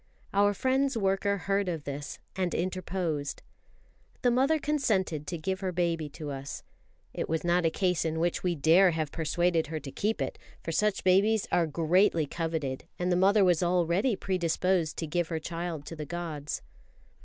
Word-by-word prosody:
Our 205 +1 +3
friend's 265 +1 +1
worker 200 0 +1
heard 195 0 0
of 165 -4 -3
this, 145 +1 -5 0.2
and 185 -2 -1
interposed. 180 -5 -2 0.8
The 245 - +4
mother 270 +6 +3
consented 205 - 0
to 170 - -3
give 190 +4 -2
her 190 -1 -2
baby 170 -3 -1
to 145 0 -7
us. 135 0 -6 0.5
It - - -3
was 160 0 0
not 175 0 +3
a - - +3
case 180 -1 0
in 160 0 -1
which 170 +1 0
we 180 -2 0
dare 165 +6 +5
have 160 -3 -2
persuaded 170 0 +1
her 160 +1 -4
to 140 -2 -8
keep 215 +9 -1
it; - - -3 0.2
for 165 - -3
such 210 +4 +1
babies 200 +3 +3
are 170 -2 +3
greatly 165 +2 +3
coveted, 160 -4 -3
and 180 +1 0
the - - +3
mother 195 +3 +5
was 175 -3 +3
already 180 +6 +2
predisposed 180 -2 0
to 165 - -2
give 170 +2 -1
her 165 - -2
child 165 -2 -4
to 165 - -7
the 155 -1 -5
gods. 160 -4 -4
175 Hz, 175 wpm, -29 LUFS, 160-195 Hz, 0.8 s, dare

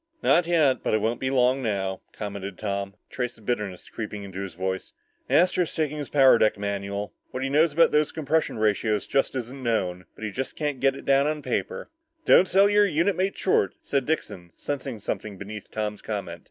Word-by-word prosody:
"Not 170 0 +4
yet, 155 -6 +3
but - - +1
it - - +2
won't 115 +3 -1
be 130 - -1
long 130 0 +3
now," 95 -5 -2
commented 100 -3 -6
Tom, 100 -1 -3
a - - -25
trace 125 -1 -3
of 110 - -18
bitterness 105 -6 -3
creeping 105 -2 -6
into 95 -1 -7
his 95 -3 -6
voice. 95 +1 -3 0.4
"Astro's 180 -1 +3
taking 150 -2 -1
his 145 - -5
power 135 -4 +6
deck 110 -1 +3
manual. 100 0 -3 0.2
What 130 - -4
he 135 - -1
knows 155 +3 +4
about 165 +2 +5
those 150 0 +2
compression 160 -3 0
ratios 105 -1 +1
just 135 - 0
isn't 130 +2 -5
known. 90 -7 -1
But - - -10
he 110 - -2
just 130 +6 -4
can't 145 -4 -2
get 135 0 +3
it - - -11
on 140 +2 +2
paper." 475 -5 -3 0.3
"Don't 185 - +6
sell 195 +2 +5
your 205 0 +4
unit 175 +3 +1
mate 190 +2 -1
short," 100 - +2
said 140 -2 -1
Dixon, 100 - -3
sensing 135 -5 -4
something 105 0 -4
beneath 105 +2 -8
Tom's 105 -1 -3
comment. 95 -6 -5
120 Hz, 200 wpm, -26 LUFS, 100-150 Hz, 0.4 s, power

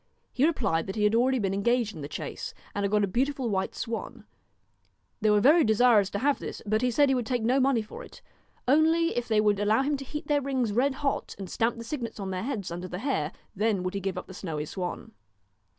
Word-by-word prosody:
He 270 +4 +3
replied 200 - 0
that 190 - -4
he 210 - 0
had 210 +1 +3
already 255 +3 +3
been 195 -5 0
engaged 235 +2 +1
DON'T 175 - -11
in - - -7
the 140 - -5
chase 145 - -6 0.2
and 200 - -2
had 200 - +1
got 210 -1 +3
a - - +2
beautiful 255 +3 -1
white 190 -1 -1
swan. 230 -2 -4
KNOW - - -16 1.0
They 215 - +3
were 210 0 +5
very 305 +9 +6
desirous 220 -2 +4
to 200 - -3
have 280 +6 +1
this, - - -6
but 215 +1 +1
he 250 - +2
said 285 +4 +4
he 270 - +3
would 245 -4 -1
take 245 -3 -1
no 250 +4 +3
money 260 -4 +2
for 215 - -10
it, - - -14 0.4
only 320 +4 +3
if 240 0 -2
they 220 -2 +2
would 210 -1 +3
allow 215 +5 +3
him 290 +1 0
to 275 - -7
heat 300 +3 -6
their 290 -1 +1
rings 260 -5 -1
red 265 +4 +2
hot 275 0 -2
and 195 -1 -6
stamp 230 +1 0
the 230 - -6
signets 230 -3 -5
on 195 -1 -4
their 185 0 -2
heads, 215 -7 -3
under 175 +2 -5
the 180 - -5
hair, 200 - -1 0.2
then 210 -2 +1
would 185 - -2
he 200 - -2
give 195 -1 -3
up - - -5
the 190 - -11
snowy 160 -6 -4
swan. 180 +2 -5
225 Hz, 255 wpm, -28 LUFS, 200-265 Hz, 1.0 s, very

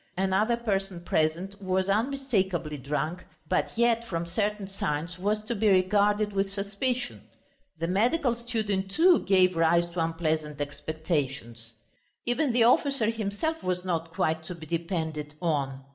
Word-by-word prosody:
Another 195 +5 +2
person 195 -6 -2
present 175 +5 -1
was 185 0 0
unmistakably 200 - 0
drunk, 150 +6 -3 0.2
but - - -1
yet, 235 0 +3
from 170 -6 -3
certain 205 +3 -1
signs, 180 -3 -3
was 210 +3 0
to 230 +3 -3
be 215 -1 +2
regarded 205 +2 +3
with 195 0 0
suspicion. 210 +6 -2 0.6
The 165 - -2
medical 235 - +2
student, 220 -5 -2
too, 340 - +5
gave 185 -2 +3
rise 165 +1 +4
to 170 -1 0
unpleasant 155 -2 -1
expectations. 140 -6 -3 0.5
Even 250 +3 +1
the 235 0 +4
officer 240 -1 +3
himself 230 +9 -2
was 180 0 -2
not 165 -2 -2
quite 160 0 0
to 180 - -6
be 160 -2 -10
depended 160 -2 -3
on. 140 -6 -1
190 Hz, 140 wpm, -28 LUFS, 165-215 Hz, 0.6 s, too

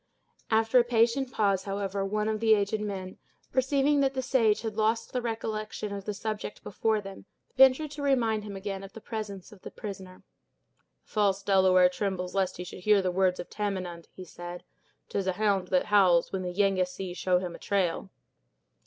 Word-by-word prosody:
After 225 +3 +4
a - - +5
patient 240 +2 +2
pause, 195 -5 +1
however, 195 0 -2
one 210 +2 -1
of 215 -1 -1
the 220 0 +5
aged 205 +1 -1
men, 190 -3 -5 0.3
perceiving 275 +2 +2
that 270 -1 +1
the 260 - -1
sage 230 -5 +2
had 220 -2 -3
lost 225 +1 0
the 250 - 0
recollection 215 -2 -4
of 200 -1 -6
the 210 - -2
subject 215 0 -5
before 220 +2 0
them, 195 -1 -10 0.3
ventured 265 +3 +5
to 295 -1 -7
remind 235 -6 +1
him 205 -1 -7
again 195 0 -5
of 195 - -11
the - - -9
presence 215 -3 -6
of 205 -3 -15
the - - -8
prisoner. 190 -4 -9 0.8
"The - - -27
false 200 -2 +1
Delaware 185 -2 +5
trembles 180 -1 -3
lest 195 -2 0
he 180 - -5
should 180 - -9
hear 210 +2 +4
the 185 - 0
words 185 0 +1
of 175 - -5
Tamenund," 185 -5 -4
he 185 - -10
said. 175 0 -8 0.4
"'Tis 195 -1 -2
a 185 - +1
hound 200 -2 +1
that 180 0 +2
howls, 185 -5 +4
when 190 - -2
the 180 -1 -3
Yengeese 185 -1 0
show 180 0 +2
him 180 -1 -4
a - - -10
trail." 190 -1 -1
200 Hz, 190 wpm, -28 LUFS, 185-220 Hz, 0.8 s, a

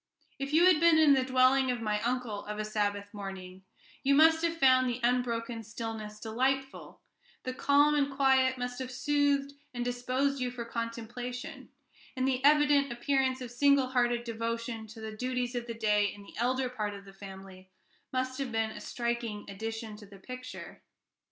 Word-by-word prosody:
If 275 +1 -3
you 325 +3 +5
had 365 -4 +6
been 335 -1 +5
in 310 -3 +6
the 265 -1 +3
dwelling 260 +1 +3
of 245 -1 -1
my 210 -2 -1
uncle 240 -3 -2
of 210 0 -5
a 215 - -2
Sabbath 205 -1 -2
morning, 190 -2 -8 0.4
you 280 0 +3
must 320 +2 +5
have 335 0 0
found 255 -3 +5
the 245 0 -3
unbroken 235 -1 0
stillness 220 -1 -6
delightful; 265 +5 -2 0.4
the 255 - -3
calm 285 +3 +4
and 285 -1 +1
quiet 265 -1 +3
must 245 0 -4
have 260 -1 -4
soothed 280 +1 +1 0.2
and 240 0 -2
disposed 255 +3 -1
you 250 - 0
for 245 -1 -6
contemplation, 235 +2 -6 0.5
and 260 0 0
the 260 -1 0
evident 290 -2 +4
appearance 260 +1 0
of 245 -2 -6
single 275 +1 +3
hearted 240 -2 +1
devotion 230 0 -4
to 220 +1 -11
the 220 -1 -6
duties 250 +1 -2
of 240 -1 -4
the 230 - -5
day 210 -2 +2
in 205 - -12
the - - -14
elder 255 +2 +1
part 215 -5 -4
of 200 0 -11
the 195 - -13
family 190 -1 -11 0.4
must 255 +1 -2
have 270 -3 -3
been 225 -1 0
a - - -9
striking 235 -3 -3
addition 225 +2 -5
to 210 -1 -13
the 200 0 -14
picture. 255 +5 -9
245 Hz, 180 wpm, -30 LUFS, 220-265 Hz, 0.5 s, had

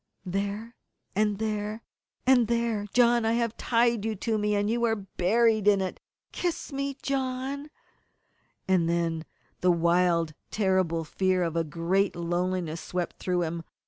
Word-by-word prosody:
"There 200 +5 -3 0.4
and 210 0 +2
there 215 0 -3 0.4
and 255 -3 +5
there, 230 -3 0
John! 240 -1 +4
I 225 +1 +2
have 235 -1 0
tied 235 -2 +2
you 220 0 -1
to 220 +2 -1
me, 210 0 +1
and 205 0 +1
you 235 +2 0
are 225 -1 +2
buried 215 +2 +1
in 205 -1 +6
it! 190 -1 -3 0.3
Kiss 345 -4 -3
me, 275 0 -2
John 270 +2 -2 0.5
" - - -43
And 180 -3 +3
then 165 -1 0 0.3
the 180 - +2
wild 170 -1 +3
and - - -23
terrible 185 -5 +1
fear 185 +3 +1
of 165 -1 -2
a 165 - +2
great 170 +5 0
loneliness 175 -1 -1
swept 180 +1 -4
through 180 -1 0
him. 165 0 -3
205 Hz, 155 wpm, -27 LUFS, 175-230 Hz, 0.5 s, in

